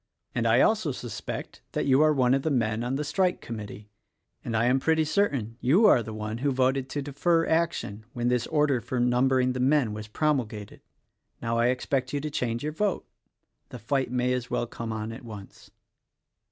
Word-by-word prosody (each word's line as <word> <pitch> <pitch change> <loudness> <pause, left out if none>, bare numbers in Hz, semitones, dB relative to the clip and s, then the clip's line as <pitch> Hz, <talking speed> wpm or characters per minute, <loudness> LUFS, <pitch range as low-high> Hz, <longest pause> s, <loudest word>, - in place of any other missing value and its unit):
And 115 - 0
I 115 +3 +5
also 215 -9 +2
suspect 120 -3 -6
that - - -1
you 135 +1 +4
are 155 0 +5
one 130 -3 +3
of 135 - +2
the 160 - -1
men 115 -4 0
on 125 +2 -1
the 150 - -1
strike 180 +5 0
Committee; 105 -2 -8 0.5
and 115 - -2
I 115 - +2
am 125 +2 +3
pretty 160 +2 +2
certain 140 - 0
you 170 - +4
are 125 - +6
the 110 - -7
one 110 +1 -5
who 140 +3 +1
voted 130 0 +1
to 145 0 -3
defer 165 +4 +1
action 160 -11 -1
when 120 0 -1
this 125 -1 +1
order 150 -5 +2
for 125 +2 -3
numbering 125 +1 +2
the 125 - -4
men 130 -3 +2
was 105 0 -7
promulgated. 110 -5 -2 0.6
Now, 115 0 -1
I 120 - +4
expect 130 +1 -1
you 145 - 0
to 150 +1 -4
change 120 -4 -2
your 150 +1 -3
vote. 200 +3 -1 0.6
The - - -8
fight 130 +3 -1
may, 125 0 0
as 125 -2 -3
well - - -1
come 115 -1 -6
on 110 0 -4
at 115 - -9
once." 105 -4 -11
125 Hz, 200 wpm, -27 LUFS, 115-145 Hz, 0.6 s, are